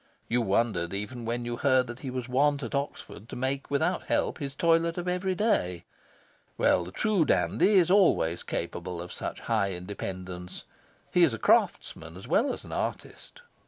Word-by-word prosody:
You 120 +1 +1
wondered 100 -4 0
even 115 +4 -5
when 120 +1 -2
you 120 0 -3
heard 130 -1 +3
that 120 0 -8
he 135 - -5
was 125 -1 -4
wont 140 +2 +2
at 115 - -5
Oxford 140 -5 -5
to - - -7
make 135 +2 -2
without 140 0 0
help - - 0
his 140 -1 -5
toilet 165 +1 +2
of 175 0 -3
every 180 +1 0
day. 90 - 0 0.7
Well, 90 - +3
the 90 - -9
true 205 - +2
dandy 90 - +2
is 180 -2 +5
always 175 - +3
capable 85 +1 -4
of 90 +1 -7
such - - -5
high 105 -4 0
independence. 90 -1 -6 0.5
He 180 - +3
is 150 -9 +5
craftsman 80 -5 +1
as 95 - -10
well 225 - +2
as - - -7
artist. - - -5
120 Hz, 170 wpm, -28 LUFS, -, 0.7 s, is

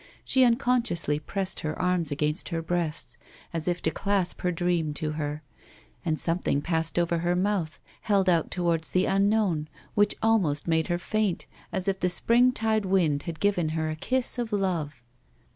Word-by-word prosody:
She 260 - +4
unconsciously 235 - +1
pressed 190 +4 -2
her 155 0 -4
arms 180 -3 +1
against 150 +3 -2
her 165 -2 -3
breast, 160 -7 -1 0.3
as 165 0 0
if 175 0 -1
to - - +1
clasp 195 -3 -1
her 180 - +1
dream 170 -3 -1
to 155 0 -2
her; 150 0 -4 0.6
and 155 -2 -1
something 165 -4 +1
passed 160 +1 -1
over 170 -1 +1
her 175 +1 0
mouth, 185 -4 -1 0.2
held 200 -3 +2
out 170 -3 +2
towards 170 -3 0
the 185 +1 +2
unknown, 195 -5 +1 0.3
which 205 0 +3
almost 185 -11 +2
made 160 -1 +1
her 175 - 0
faint, 210 0 -1 0.3
as 190 -2 0
if 190 -1 0
the 180 - +1
springtide 225 +1 +2
wind 165 -7 +2
had 165 -2 -6
given 180 -5 +1
her 160 0 -1
a - - -4
kiss 255 +8 0
of 235 -2 -3
love. 165 -10 -2
175 Hz, 170 wpm, -27 LUFS, 160-200 Hz, 0.6 s, She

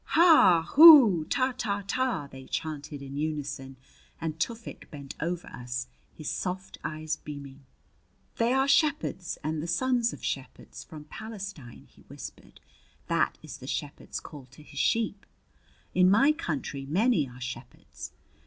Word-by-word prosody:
"Ha! 315 - +7
Hoo! 275 - +9
Ta, 255 - 0
Ta, 205 -5 -2
Ta!" 255 - -1
they 130 0 -11
chanted 150 -2 -5
in 140 0 -7
unison; 145 -3 -4 0.4
and 160 -1 -4
Tufik 230 +7 -5
bent 140 -3 -9
over 175 +1 -3
us, 125 0 -5 0.3
his 155 - -9
soft 185 +1 -4
eyes 155 0 -3
beaming. 140 -2 -10 0.7
"They 230 +1 +2
are 265 +1 +2
shepherds 275 - +1
and 155 +1 -2
the 165 - -5
sons 240 +6 +1
of - - -9
shepherds - - -6
from 155 -3 -11
Palestine," 195 - -9
he - - -23
whispered. - - -11 0.5
"That - - +1
is - - -8
the - - -11
shepherd's - - -5
call 140 -4 -11
to 135 +4 -16
his - - -9
sheep. 220 -3 0 0.7
In 185 0 +5
my 265 +10 +5
country 145 - -4
many 180 - +2
are 125 0 -13
shepherds. 125 0 -8
165 Hz, 145 wpm, -28 LUFS, 140-230 Hz, 0.7 s, Hoo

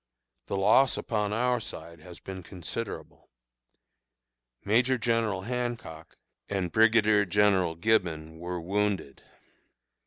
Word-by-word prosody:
The 100 - -2
loss 130 +7 +4
upon 105 -2 -1
our 125 +3 +1
side 85 -6 -8
has 85 +2 -13
been 95 -1 -8
considerable. 95 +5 -7 1.4
Major 120 +5 +3
General 115 -4 0
Hancock 120 -9 -5 0.3
and 95 -4 -2
Brigadier 110 -2 +4
General 95 -3 +2
Gibbon 85 -5 0
were 90 +1 -4
wounded. 95 -4 -2
100 Hz, 100 wpm, -28 LUFS, 85-115 Hz, 1.4 s, loss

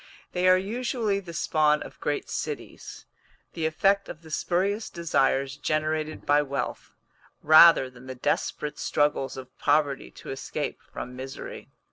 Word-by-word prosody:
They 180 0 +1
are 185 0 +7
usually 220 +1 -1
the 180 -4 -9
spawn 155 -2 +2
of - - -12
great 145 -1 -2
cities - - -6 0.5
the 160 -2 -1
effect 195 +5 +2
of 160 0 -9
the 160 - -13
spurious 195 +7 0
desires 140 -5 0
generated 155 +1 -2
by 145 0 +4
wealth, 140 -1 -4 0.5
rather 155 -2 +8
than 125 0 -14
the 130 - -6
desperate 145 +3 -2
struggles 135 -3 0
of 130 -1 -10
poverty 145 -2 +1
to - - -10
escape 135 - -4
from 125 +1 -7
misery. 130 +1 -8
155 Hz, 140 wpm, -26 LUFS, 135-180 Hz, 0.5 s, rather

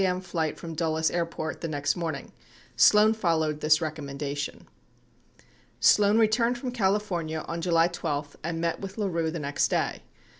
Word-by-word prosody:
m. 180 -1 +1
flight 165 -4 -3
from 165 -1 -7
Dulles 160 0 0
Airport 165 -2 -3
the 165 - -2
next 145 -2 -1
morning. 165 -5 -4 0.4
Sloan 210 +1 +6
followed 160 -7 0
this 155 +2 +4
rec 155 -1 -3
ommendation. 145 0 -4
82 - - -21 1.1
Sloan 205 +1 +5
returned 230 +2 +3
from 250 +1 -4
California 190 -8 -1
on 170 0 -4
July 165 -1 +3
12 150 -4 -4
and 165 0 -3
met 170 0 -1
with 195 +1 -7
LaRue 170 -6 -1
the 165 - -4
next 145 -2 0
day. - - -1
165 Hz, 160 wpm, -27 LUFS, 155-190 Hz, 1.1 s, Sloan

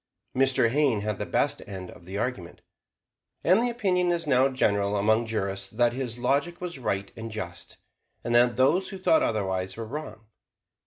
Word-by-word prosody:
Mr. 130 -2 +3
Hayne 135 -5 +2
had 105 -1 -3
the - - -3
best - - 0
end 95 -2 -7
of 85 - -15
the 95 +2 -6
argument, 100 -7 -4 0.8
and 185 +6 +4
the 245 - +1
opinion 185 -7 +1
is 170 -1 -1
now 135 -1 +4
general 100 -5 +1
among 110 +3 +2
jurists 95 -3 -2
that 120 +3 +2
his 125 -2 -4
logic 140 +8 0
was 175 -5 -5
right 100 -5 -2
and 115 0 -6
just, 90 -6 -7 0.5
and 120 - -2
that 120 0 +5
those 160 +9 +3
who 195 - -6
thought 310 +12 +3
otherwise 95 -2 -1
were 115 - -4
wrong. 115 -4 -7
120 Hz, 175 wpm, -27 LUFS, 100-140 Hz, 0.8 s, that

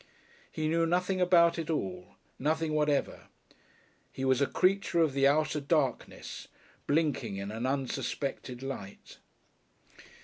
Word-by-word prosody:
He 155 -1 -2
knew 165 +1 +2
nothing 180 +2 0
about 170 -2 +5
it 165 - -4
all 95 - -3 0.2
nothing 155 +2 0
whatever; 150 -2 0 0.8
he 135 - -4
was 130 0 +3
a 140 - +3
creature 190 -2 +1
of 160 -4 +3
the 135 0 +4
outer 150 +1 +2
darkness 140 -3 -2 0.4
blinking 145 -8 0
in 100 +1 -5
an 115 +4 -3
unsuspected 135 -1 -3
light. 125 -8 -8
150 Hz, 125 wpm, -30 LUFS, 130-165 Hz, 0.8 s, about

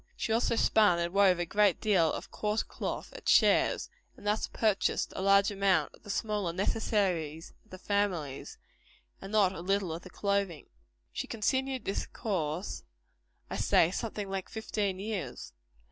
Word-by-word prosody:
She 220 - -1
also 230 0 +2
spun 210 -5 +4
and 170 +1 -2
wove 195 -2 +5
a 175 - -1
great 200 +1 +2
deal 185 -7 +3
of - - -6
coarse 210 +1 -1
cloth, - - -5
at - - -5
shares; - - +4 0.3
and - - -14
thus 210 +1 0
purchased 215 -3 0
a - - -3
large 200 +1 +5
part 185 -7 +2
of - - -19
the 205 - -13
smaller 205 -3 -1
necessaries 180 -5 -1
of 220 - -30
the 185 - -9
family, 185 -9 -1 0.8
and 195 - -8
not 200 -3 +3
a 170 - -7
little 195 -2 0
of 165 - -6
the 185 - -12
clothing. 200 -5 -1 0.5
She - - -4
continued 260 +4 -1
this 195 - -2
course, 175 -4 -3 0.7
I - - -5
say, 165 - +3
something 210 -1 -4
like 195 -1 -4
fifteen 210 -3 -2
years. 200 - -5
200 Hz, 160 wpm, -30 LUFS, 180-210 Hz, 0.8 s, wove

